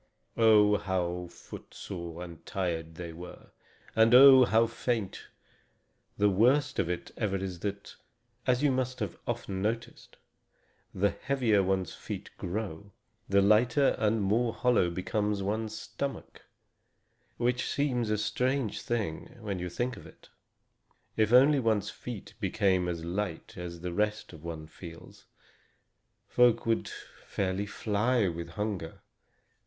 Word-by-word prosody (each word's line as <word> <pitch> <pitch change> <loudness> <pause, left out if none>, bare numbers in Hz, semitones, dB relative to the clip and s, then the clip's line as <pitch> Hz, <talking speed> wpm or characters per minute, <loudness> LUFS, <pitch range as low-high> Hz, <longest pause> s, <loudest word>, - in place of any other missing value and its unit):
Oh, 105 -2 +5
how 90 -2 -2
footsore 85 0 -8
and 85 -2 -10
tired 80 -4 -3
they 85 -1 -7
were! 90 +2 -11 0.4
And 115 +2 +6
oh, 130 -1 +10
how 115 0 +4
faint! 115 -3 -3 0.9
The 105 - +4
worst 130 +8 +3
of 85 - +1
it 90 - -4
ever 105 -4 0
is 95 -2 -5
that 100 +1 -5 0.5
as 125 +2 +2
you 145 - +4
must 130 0 -1
often 95 - -5
have - - -3
noticed 105 +4 -4 0.7
the 100 +2 +1
heavier 125 -7 +1
one's 95 -2 -1
feet - - -7
grow, 100 0 -4 0.4
the 100 0 +4
lighter 120 +7 +4
and 110 -1 +2
more 115 +4 +1
hollow 120 -8 +3
becomes 100 +3 -1
one's 110 +2 -2
stomach; 135 +4 -6 0.9
which 125 +1 0
seems 125 -5 0
a 105 - +1
strange 120 +2 -1
thing, 110 -5 -3
when 100 -5 -4
you 90 0 -3
think 120 +8 -2
of - - -11
it. - - -18 0.9
If 110 -1 +2
only 135 +4 +6
one's 110 -4 +1
feet 120 -5 -8
became 95 -4 +1
as 85 -2 -3
light 90 -1 -4
as 85 -1 -7
the 90 -1 -4
rest 105 0 -1
of 80 -1 -12
one 80 -2 -6
feels, 85 +1 -12 1.0
folk 125 -2 +4
could 115 -1 0 0.4
fairly 100 +1 -1
fly 105 +2 +1
with 85 -1 -4
hunger. 105 -6 -4
105 Hz, 135 wpm, -30 LUFS, 90-115 Hz, 1.0 s, oh